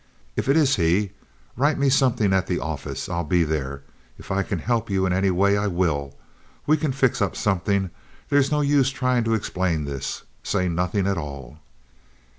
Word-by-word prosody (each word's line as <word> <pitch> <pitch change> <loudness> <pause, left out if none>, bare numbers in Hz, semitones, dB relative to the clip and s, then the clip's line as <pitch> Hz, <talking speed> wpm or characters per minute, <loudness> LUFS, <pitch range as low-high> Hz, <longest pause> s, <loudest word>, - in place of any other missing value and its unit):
If - - -2
it 140 - +5
is 145 -5 +3
he, 90 +4 +2 0.4
write 145 +5 +2
me 140 - +2
something 125 -7 +3
at 95 -1 +1
the 90 - 0
office. 80 -4 -4
I'll 85 -1 -2
be 85 +2 +2
there. 70 -3 -3 0.3
If - - -10
I 95 0 +1
can 95 0 -2
help 115 +7 -1
you 95 -1 +1
in 90 - +1
any 95 +1 +2
way, 100 +2 +3
I 100 0 0
will. 75 -7 -1 0.5
We 155 - +4
can 155 -2 -1
fix 130 -3 +1
up 95 -4 0
something. 95 -1 0 0.4
There's 140 -1 +3
no 150 0 +2
use 140 -2 +3
trying 125 -2 0
to 115 0 +2
explain 90 -6 -1
this. 70 -2 -4 0.2
Say 90 -3 0
nothing 90 +3 0
at 100 -2 0
all." 70 -2 -8
95 Hz, 190 wpm, -24 LUFS, 85-125 Hz, 0.5 s, it